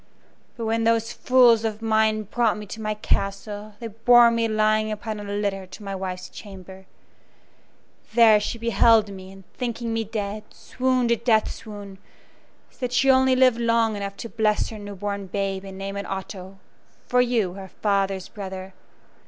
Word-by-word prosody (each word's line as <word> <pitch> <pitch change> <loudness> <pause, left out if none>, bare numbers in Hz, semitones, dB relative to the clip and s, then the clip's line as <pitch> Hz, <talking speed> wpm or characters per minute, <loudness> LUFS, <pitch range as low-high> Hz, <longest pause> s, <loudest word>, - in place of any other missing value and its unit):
But 230 - -4
when 225 +1 0
those 230 0 +1
fools 245 -3 +4
of 215 -1 -2
mine 220 -1 +1
brought 225 +1 0
me 210 - -7
to 220 +3 -8
my 215 0 -2
castle 205 +1 -3
they 235 - -7
bore 235 +2 +5
me 230 0 +1
lying 215 0 +1
upon 215 0 -5
a - - -7
litter 200 -2 -3
to 205 - -12
my 195 -1 -5
wife's 185 -1 -5
chamber. 190 -2 -12 1.3
There 225 -3 +7
she 220 +3 -3
beheld 230 -2 +4
me, 190 -1 -10
and, 195 0 -14
thinking 235 -2 -3
me 225 0 0
dead, 210 -1 -5
swooned 255 -2 -1
a 235 - +3
death 220 -1 +2
swoon, 205 -3 -10 0.7
so - - -26
that 250 -2 -3
she 265 +2 +4
only 260 0 +4
lived 255 -2 +4
long 230 -2 +2
enough 200 -1 -5
to 230 - -7
bless 215 -2 0
her 220 - -8
new 205 0 -8
born 200 0 -4
babe 195 0 -2
and 195 -1 -9
name 195 +1 -5
it 200 0 -5
Otto, 190 0 -7 0.5
for 250 0 +3
you, 230 -7 0
her 195 0 -9
father's 195 -1 -1
brother. 190 -2 -8
215 Hz, 175 wpm, -24 LUFS, 195-230 Hz, 1.3 s, There